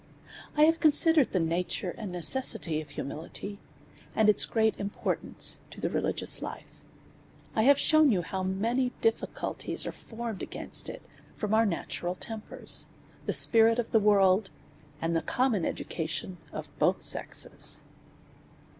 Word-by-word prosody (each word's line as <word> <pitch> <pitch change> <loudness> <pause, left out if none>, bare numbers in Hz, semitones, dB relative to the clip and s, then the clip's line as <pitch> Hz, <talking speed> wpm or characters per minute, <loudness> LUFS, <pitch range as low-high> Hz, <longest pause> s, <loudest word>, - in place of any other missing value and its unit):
I 300 - +6
have 325 +1 +4
considered 310 -2 +5
the 185 - +1
nature 175 +2 -1
and 210 -5 -6
necessity 175 -4 +2
of 150 - -12
humi 140 - -5
lity;, 200 +6 -6 0.6
and 215 -1 +4
its 210 - +6
great 220 -1 +1
importance 200 +1 -2
to - - -13
a - - -1
rehgious - - +1
hfe. - - -6 0.9
I 220 - +3
have 275 +4 +5
shewn 310 -1 +4
you 180 -5 +1
how 190 +3 -4
many 230 +7 -1
difficulties 225 0 -1
are - - -3
formed 230 -3 -7
against - - -1
it - - -9 0.3
from 210 -1 -2
our 225 0 +4
natural 175 0 -3
tempers^ 220 +3 -5 0.4
the - - 0
spirit 225 0 +5
of 240 -2 -2
the 220 - +5
worlds 200 -1 +3 0.5
and 165 +1 -1
the 165 - +1
common 245 -9 0
education 160 +2 -4
of - - -6
both - - +2
sexes. - - -3
210 Hz, 145 wpm, -28 LUFS, 180-235 Hz, 0.9 s, I